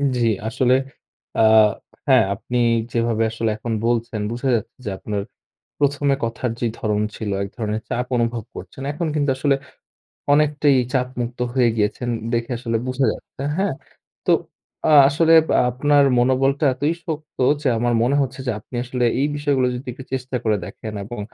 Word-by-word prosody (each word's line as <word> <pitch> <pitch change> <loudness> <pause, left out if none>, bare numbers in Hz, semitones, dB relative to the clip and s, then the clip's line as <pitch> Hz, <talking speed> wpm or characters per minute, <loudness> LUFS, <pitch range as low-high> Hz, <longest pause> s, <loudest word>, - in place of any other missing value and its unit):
জী, 125 - -1 0.3
আসলে 125 +2 +2 0.6
আ - - +4 0.6
হ্যাঁ, 130 -5 +6
আপনি 120 +4 -4 0.3
যেভাবে 115 -1 +1
আসলে 115 0 -1
এখন 115 +1 -3
বলছেন, 115 -2 0
বুঝা 120 +3 -3
যাচ্ছে 110 - -4
যে - - -2
আপনার 105 0 -3 0.6
প্রথমে 145 0 +2
কথার 115 +2 -2
যে 120 - +1
ধরন 105 -1 0
ছিল, 110 -2 -4
এক 100 - -3
ধরনের 110 -1 -2
চাপ 125 +1 -1
অনুভব 115 -1 0
করছেন। 95 +8 -9
এখন 170 +3 -3
কিন্তু 145 -2 +1
আসলে 140 +1 +2 0.8
অনেকটাই 145 -1 +3 0.2
চাপমুক্ত 125 -2 -2 0.2
হয়ে 125 -3 +4
গিয়েছেন, 110 +3 -1 0.2
দেখে 115 +1 -1
আসলে 115 -1 -1
বুঝা 130 +1 +1
যাচ্ছে, - - -10
হ্যাঁ? 190 -5 0 0.5
তো - - +5 0.6
আ - - +5 0.2
আসলে 160 +3 +3 0.4
আপনার 145 +3 +3
মনোবলটা 135 +3 +2
এতই 145 +5 0
শক্ত 155 -2 -6 0.2
যে - - +1
আমার 120 +1 +1
মনে 130 +4 +2
হচ্ছে 135 0 -4
যে, - - +1
আপনি 125 - -9
আসলে 125 0 -1 0.2
এই 140 - +3
বিষয়গুলো 140 -3 +1
যদি 125 +2 -7
একটু 130 +2 -10
চেষ্টা 130 0 -2
করে 110 -2 +2
দেখেন 110 - -8
এবং 120 +2 -7
125 Hz, 160 wpm, -21 LUFS, 115-140 Hz, 0.8 s, হ্যাঁ